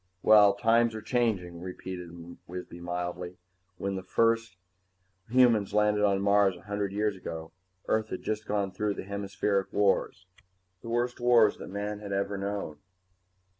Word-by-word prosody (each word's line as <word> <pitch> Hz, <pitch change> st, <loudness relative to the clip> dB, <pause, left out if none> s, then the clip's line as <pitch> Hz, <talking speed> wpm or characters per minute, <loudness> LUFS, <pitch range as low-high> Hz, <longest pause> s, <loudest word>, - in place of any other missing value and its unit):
"Well, 105 Hz, -2 st, +7 dB
times 115 Hz, +2 st, +3 dB
are 110 Hz, -, -5 dB
changing," 100 Hz, -9 st, -1 dB
repeated 90 Hz, -1 st, -7 dB, 0.4 s
Wisby 90 Hz, -1 st, -8 dB
mildly. 90 Hz, +1 st, -4 dB, 0.4 s
"When 100 Hz, +1 st, -2 dB
the 95 Hz, -, -4 dB
first 115 Hz, +1 st, +1 dB, 0.7 s
humans 115 Hz, -5 st, +4 dB
landed 105 Hz, 0 st, +3 dB
on 100 Hz, -1 st, +2 dB
Mars 100 Hz, -2 st, +4 dB
a -, -, -15 dB
hundred 100 Hz, -1 st, -3 dB
years 105 Hz, 0 st, 0 dB
ago, 80 Hz, -3 st, -7 dB, 0.4 s
Earth 110 Hz, 0 st, 0 dB
had 95 Hz, -, -5 dB
just 110 Hz, 0 st, -3 dB
gone 100 Hz, -2 st, -1 dB
through 105 Hz, +1 st, -2 dB
the -, -, -6 dB
Hemispheric 100 Hz, 0 st, -2 dB
Wars. 95 Hz, -2 st, +1 dB, 0.6 s
The 115 Hz, -, -8 dB
worst 120 Hz, +1 st, -1 dB
wars 120 Hz, -3 st, +4 dB
man 105 Hz, +1 st, -5 dB
had 100 Hz, -1 st, -6 dB
ever 100 Hz, +1 st, -1 dB
known. 100 Hz, -6 st, -4 dB
100 Hz, 145 wpm, -29 LUFS, 95-110 Hz, 0.7 s, Well